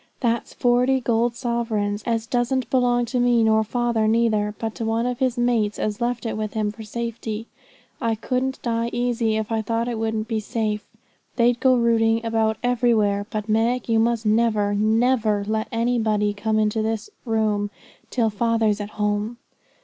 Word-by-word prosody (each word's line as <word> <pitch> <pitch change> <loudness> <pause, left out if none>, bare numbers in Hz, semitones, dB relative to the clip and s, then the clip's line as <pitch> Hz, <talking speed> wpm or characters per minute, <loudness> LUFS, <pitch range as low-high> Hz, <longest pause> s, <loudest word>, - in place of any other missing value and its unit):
'That's 235 -2 0
forty 250 +2 +3
gold 235 -1 +1
sovereigns, 225 -4 -1
as 225 -1 0
doesn't 245 +1 0
belong 245 -2 +2
to 245 +2 -2
me, 245 -1 +3
nor 220 0 +4
father 235 -1 0
neither, 215 -2 +1
but 225 -1 -3
to - - -5
one 225 +1 0
of 250 0 -2
his 255 -2 0
mates 235 -4 +1
as 215 +1 -2
left 240 0 -1
it 225 - -2
with 215 0 -4
him 210 -1 0
for 220 - -11
safety. 225 0 -5 0.6
I 225 -1 +1
couldn't 255 +4 -2
die 230 -1 0
easy 240 -2 0
if 220 +1 -3
I 225 -1 +1
thought 230 +2 -1
it 235 -2 -3
wouldn't 220 -1 -2
be 225 -1 -1
safe. 215 -1 -2 0.5
They'd 240 0 +3
go 260 -1 +4
rooting 230 -1 +2
about 220 -1 +1
everywhere; 225 -5 +2
but, 215 -1 -4
Meg, 230 +3 +1
you 225 -1 +3
must 230 0 +1
never, 215 -2 +2
never, 220 0 +2
never - - -5
let 220 0 -1
anybody 225 -3 +1
come 215 +1 -1
into 215 +1 +1
the 220 0 -2 0.2
room 215 -3 0 0.4
till 230 -3 +1
father's 220 -1 +1
at 205 - -5
home.' 210 +2 -1
225 Hz, 175 wpm, -23 LUFS, 215-240 Hz, 0.6 s, nor